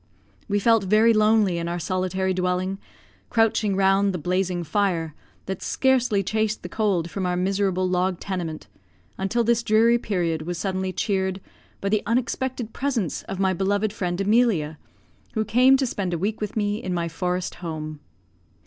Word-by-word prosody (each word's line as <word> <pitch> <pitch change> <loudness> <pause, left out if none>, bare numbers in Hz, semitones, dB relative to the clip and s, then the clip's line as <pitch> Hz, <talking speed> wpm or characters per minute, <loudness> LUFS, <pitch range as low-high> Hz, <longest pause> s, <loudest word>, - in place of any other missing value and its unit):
We 205 -1 +1
felt 225 0 +3
very 215 +4 +5
lonely 215 -4 +3
in 170 - -3
our 170 +1 -2
solitary 185 +2 -1
dwelling, 185 +1 -1 0.5
crouching 225 -3 +2
round 195 +1 +3
the - - -2
blazing 180 +1 -1
fire, 165 -2 0 0.3
that 190 -1 -4
scarcely 250 -6 +2
chased 215 +2 -1
the - - -6
cold 185 -6 0
from 190 -2 -2
our 180 0 0
miserable 190 0 +1
log 180 0 0
tenement, 175 -5 -4 0.5
until 220 +5 +1
this 235 0 +2
dreary 230 +2 +4
period 175 -7 -1
was 175 +2 -4
suddenly 190 0 -2
cheered 190 0 -1 0.4
by 200 - -1
the 215 0 +2
unexpected 245 0 -1
presence 250 - -1
of 195 - -4
my 190 -1 +2
beloved 200 +3 0
friend, 180 -4 -2
Emilia, 195 -8 +2 0.6
who 220 0 0
came 255 +5 +5
to 265 - 0
spend 190 -7 -2
a - - -2
week 205 +6 -2
with 210 +1 -4
me 205 0 0
in 185 -1 -3
my 170 -1 -1
forest 180 +2 -2
home. 155 -3 -5
195 Hz, 165 wpm, -24 LUFS, 180-215 Hz, 0.6 s, very